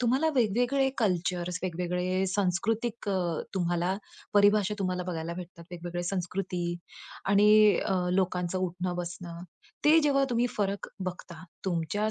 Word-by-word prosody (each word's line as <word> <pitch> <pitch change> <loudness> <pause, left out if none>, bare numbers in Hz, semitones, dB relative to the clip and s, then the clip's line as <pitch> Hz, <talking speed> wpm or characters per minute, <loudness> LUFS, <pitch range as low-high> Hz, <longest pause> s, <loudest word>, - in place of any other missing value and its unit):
तुम्हाला 260 +6 +2
वेगवेगळे 245 +4 +2
कल्चर, 180 -4 0
वेगवेगळे 180 +1 -1
सांस्कृतिक 205 +5 -1
अ, 195 - +1 0.4
तुम्हाला 175 +1 0 0.4
परिभाषा 205 0 +4
तुम्हाला 185 -2 -1
बघायला 170 -1 -4
भेटतात. 170 -1 -9
वेगवेगळ्या 175 0 -5
संस्कृती 180 -1 -2 0.6
आणि 205 +1 +5 0.4
अ, 195 - +1 0.2
लोकांचं 180 -1 0
उठणं-बसणं, 175 -1 -4 0.4
ते 310 +2 +7
जेव्हा 275 -2 +3
तुम्ही 240 +1 +2
फरक 200 -1 -1 0.2
बघता 170 -2 -9 0.2
तुमच्या 190 +4 0
185 Hz, 115 wpm, -29 LUFS, 175-210 Hz, 0.6 s, ते